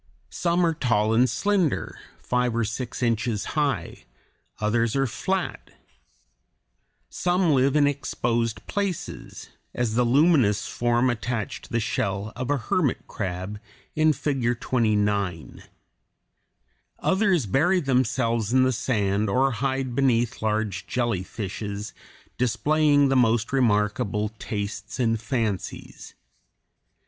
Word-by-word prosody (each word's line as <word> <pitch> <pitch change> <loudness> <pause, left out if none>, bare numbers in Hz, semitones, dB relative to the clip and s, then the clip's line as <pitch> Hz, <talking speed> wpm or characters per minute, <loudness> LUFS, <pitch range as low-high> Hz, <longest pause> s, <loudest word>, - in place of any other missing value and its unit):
Some 175 0 +1
are 165 - +2
tall 110 -7 +1
and 125 +3 +4
slender, 185 - 0 0.2
five 125 -1 -1
or 115 - +1
six 120 +3 -4
inches 115 -2 0
high; 140 - -1 0.5
others 115 +2 +1
are 135 0 +2
flat. 185 +9 -3 1.4
Some 180 -1 +1
live 135 0 +3
in 150 -1 +5
exposed 120 -5 -1
places, 200 -4 -4 0.2
as 120 -3 0
the 125 +2 +3
luminous 130 - +3
form 120 +1 +1
attached 120 -2 -4
to - - -18
the 120 - +1
shell 100 -1 -2
of 130 +1 -4
a 145 - +2
hermit 135 +4 0
crab 95 +1 -4 0.4
in 155 0 +4
Figure 135 -5 0
29. 105 -8 -1 1.4
Others 190 - +2
bury 155 - +2
themselves 125 - 0
in 130 0 +4
the 130 - +3
sand 105 -4 0
or 135 +6 +2
hide 130 +2 -2
beneath 120 -3 +1
large 105 -3 -1
jellyfishes, 105 -2 -3 0.5
displaying 145 +4 +3
the 135 - +2
most 115 -1 +2
remarkable 105 -3 +1
tastes 100 0 -5
and 115 -3 +1
fancies. 115 -6 -4
120 Hz, 115 wpm, -25 LUFS, 105-135 Hz, 1.4 s, in